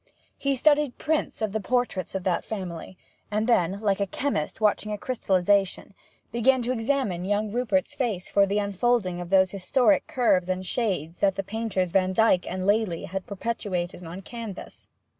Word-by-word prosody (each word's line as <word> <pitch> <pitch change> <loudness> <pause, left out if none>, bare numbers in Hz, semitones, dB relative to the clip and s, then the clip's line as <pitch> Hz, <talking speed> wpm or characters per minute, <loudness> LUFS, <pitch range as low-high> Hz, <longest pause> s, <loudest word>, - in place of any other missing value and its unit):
He 275 -1 +1
studied 290 -1 +3
prints 310 -7 -1
of 215 - 0
the 220 - -1
portraits 220 -5 -1
of 190 - -2
that 180 -2 0
family, 185 -3 -6 0.3
and 210 +1 0
then, 195 -5 +2
like 200 -2 +1
a 200 - 0
chemist 205 - -2
watching 215 0 +1
a 210 - -2
crystallization, 200 -4 +1 0.4
began 245 +2 +3
to 245 - 0
examine 225 -7 -1
young 205 +2 0
Rupert's 250 +5 0
face 235 -10 -2
for 200 0 +3
the 200 +1 0
unfolding 200 -2 0
of 175 - -7
those 190 -1 +4
historic 260 +9 +2
curves 190 -8 +2
and 185 0 -2
shades 180 -8 -2
that 195 -1 +2
the 195 - -2
painters 200 -4 -2
Vandyke 185 +1 +3
and 185 0 -3
Lely 205 -4 +1
had 190 +1 -5
perpetuated 190 -4 -3
on 170 +3 -7
canvas. 225 -2 -9
200 Hz, 165 wpm, -26 LUFS, 185-235 Hz, 0.4 s, those